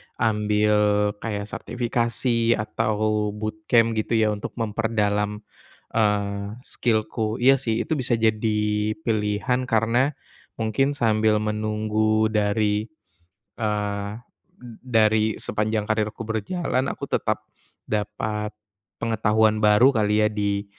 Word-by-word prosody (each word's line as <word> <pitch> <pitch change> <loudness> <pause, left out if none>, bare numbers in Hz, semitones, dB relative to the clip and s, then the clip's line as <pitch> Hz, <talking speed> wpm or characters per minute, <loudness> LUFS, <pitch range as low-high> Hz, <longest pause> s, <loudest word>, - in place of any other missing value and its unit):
ambil 105 -1 +2
kayak 105 -3 -3
sertifikasi 115 +1 0
atau 110 -1 -1
bootcamp 110 +2 +1
gitu 110 +2 -1
ya 110 -1 +3
untuk 105 -1 -5
memperdalam, 105 -2 -1 0.5
eee, 100 -1 0
skill-ku, 110 -2 -1
iya 135 +1 +6
sih 115 -3 -1
itu 160 -3 -2
bisa 125 -2 +1
jadi 110 -1 +1 0.4
pilihan 115 +3 0
karena 120 +6 +2 0.4
mungkin 115 +6 0
sambil 110 -4 +2
menunggu 110 0 0
dari, 105 0 +1 0.7
eee, 105 -2 -2 0.5
d 120 -2 -11
dari 110 -3 +2
sepanjang 105 0 -1
karierku 110 0 -1
berjalan 130 - -1
aku - - -6
tetap - - -1 0.4
dapat 105 0 -2 0.5
pengetahuan 110 -1 +2
baru 105 +6 +6
kali 105 -1 +2
ya - - +4
di, 100 -1 -1
110 Hz, 105 wpm, -24 LUFS, 105-115 Hz, 0.7 s, iya